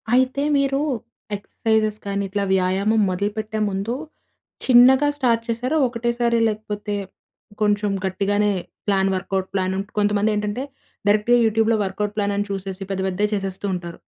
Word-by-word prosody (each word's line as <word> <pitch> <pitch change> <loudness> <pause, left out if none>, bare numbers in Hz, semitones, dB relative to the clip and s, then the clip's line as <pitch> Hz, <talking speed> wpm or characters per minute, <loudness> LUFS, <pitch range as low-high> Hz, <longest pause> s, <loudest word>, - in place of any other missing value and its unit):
అయితే 260 +2 +2 0.2
మీరు 275 0 +1 0.6
ఎక్సర్సైజెస్ 215 +1 0
కానీ, 200 0 -1
ఇట్లా 200 +1 -1
వ్యాయామం 190 +4 +2
మొదలుపెట్టే 210 +3 -2
ముందు 200 +4 -2 0.7
చిన్నగా 260 +3 +7
స్టార్ట్ 235 -5 +2
చేశారా? 245 +6 -1
ఒకటేసారి 235 0 0
లేకపోతే, 210 -1 -4 0.7
కొంచెం 205 0 +2 0.2
గట్టిగానే 205 +2 +1 0.4
ప్లాన్ 195 -1 +2
వర్క్‌ఔట్ 190 0 -2
ప్లాన్ 190 -1 0 0.2
కొంతమంది 205 +1 +2
ఏంటంటే, 210 +4 -2 0.5
డైరెక్ట్‌గా 210 +4 +4
యూట్యూబ్‌లో 225 +1 +3
వర్క్‌ఔట్ 205 +2 -3
ప్లాన్ 205 -1 0
అని 205 0 -1
చూసేసి 195 0 -5
పెద్ద, 195 -1 -1
పెద్దయి 205 +3 -1
చేసేస్తూ 195 0 -3
ఉంటారు. 175 -1 -7
210 Hz, 125 wpm, -22 LUFS, 195-225 Hz, 0.7 s, చిన్నగా